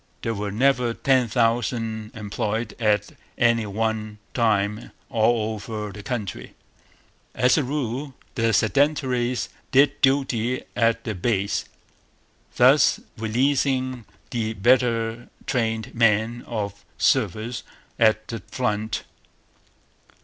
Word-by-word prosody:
There 115 - -1
were 105 -1 -3
never 125 +1 +2
ten 130 -3 +3
thousand 115 -1 0
employed 110 +1 -3
at 105 -2 +1 0.3
any 115 -2 +3
one 110 +1 -2 0.2
time 105 -2 +1 0.2
all 110 -1 +2
over 105 0 -5
the 105 - -9
country. 105 -3 -5 0.8
As 125 0 +4
a 150 - +2
rule, 135 0 -3 0.2
the 115 -1 +1
'Sedentaries' 125 +1 +1 0.2
did 140 +2 +4
duty 130 -3 +1
at 115 0 +2
the 110 - -3
base, 100 +1 0 0.9
thus - - +5 0.2
releasing 130 +1 0 0.3
the 110 -2 -1
better 115 +1 +2 0.2
trained 115 -4 -1
men 115 +1 +2
for 105 -4 -3 0.2
service 115 0 +1 0.4
at 110 -1 +3
the 115 - -5
front. 110 -2 -2
115 Hz, 105 wpm, -24 LUFS, 110-125 Hz, 0.9 s, thus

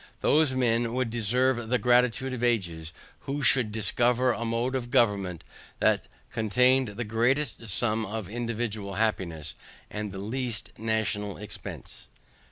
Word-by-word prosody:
Those 150 -3 +3
men 120 -1 +1
would 130 -3 0
deserve 120 +1 +1
the 125 - +3
gratitude 125 +1 +2
of 125 - -5
ages, 85 -10 -1 0.3
who 140 +1 -4
should 120 -2 +5
discover 120 +4 +2
a 115 - -3
mode 115 +3 -1
of 125 -2 -3
government 100 -8 +1 0.3
that - - +2 0.3
contained 125 +4 +3
the 120 - -1
greatest 120 +3 0
sum 110 +1 0
of 105 -1 -4
individual 110 -3 -3
happiness, 85 -8 -1 0.4
with 105 -1 -4
the 95 - -7
least 115 +2 -3
national 110 -2 -1
expense." 105 +1 -8
115 Hz, 135 wpm, -27 LUFS, 105-125 Hz, 0.4 s, should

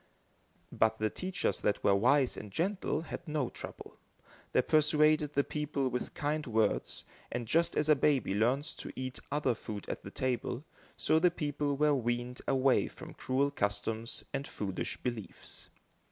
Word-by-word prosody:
But 110 0 +2
the 110 0 0
teachers 185 0 -1
that 105 - +1
were 100 - +5
wise 125 +6 +4
and 105 - -7
gentle 190 - 0
had 170 +1 -7
no 150 -5 0
trouble. - - -9 0.5
They - - +3
persuaded 150 -1 +4
the 140 - +4
people 145 -3 -1
with 125 0 -4
kind 150 0 -1
words, 110 -2 +1 0.3
and, 120 - -3
just 165 +8 +2
as 150 - +2
a 155 - +7
baby 135 -7 +2
learns 125 +8 +1
to - - -6
eat 130 0 -4
other 145 -3 +2
food 105 -2 -7
at - - -4
the - - -8
table, 130 +1 -2 0.3
so 160 - +3
the 180 +2 +5
people 145 -3 -1
were 150 0 +4
weaned 120 -1 -1
away 135 -1 +3
from - - -10
cruel 140 +2 0
customs 110 +1 -2
and 140 0 -2
foolish 95 -3 -3
beliefs. 120 -5 -6
135 Hz, 160 wpm, -32 LUFS, 115-150 Hz, 0.5 s, a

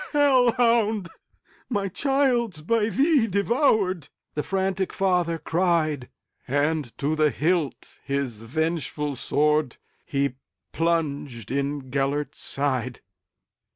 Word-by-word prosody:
"Hell 270 -4 +5
hound! 225 -6 +2 0.6
my 205 -5 0
child 255 -1 +1
's 155 - -10
by 220 +6 +1
thee 270 - +3
devoured,"The 200 - 0
frantic 190 +1 -1
father 180 -3 +1
cried; 160 -5 0 0.4
And 145 -1 0
to 150 +3 0
the 155 -1 +3
hilt 160 -1 -1
his 140 -6 -2
vengeful 150 +3 -2
swordHe 140 -1 -1 0.4
plunged 145 - -1
in 140 -1 -2
Gêlert's 140 +2 -1
side. 130 -3 -2
160 Hz, 95 wpm, -25 LUFS, 140-200 Hz, 0.6 s, Hell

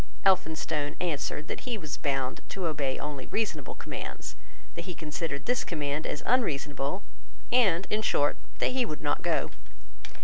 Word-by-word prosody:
Elphinstone 160 -5 +3
answered 155 -2 -1
that - - -2
he 245 -3 -2
was 155 -7 -3
bound 135 -2 0
to 190 -2 -2
obey 145 -5 +1
only 145 -3 -4
reasonable 220 -1 -1
commands, - - -5 0.4
that - - -5
he 180 -2 -4
considered 150 -2 -3
this 245 0 +2
command 150 -2 -1
as 145 - -2
unreasonable, 150 - +1 0.5
and, 195 -8 +5
in 215 - +3
short, 145 -8 +3 0.2
that - - +3
he 255 0 +3
would 155 - -4
not - - +2
go. - - +1
155 Hz, 150 wpm, -30 LUFS, 145-195 Hz, 0.5 s, and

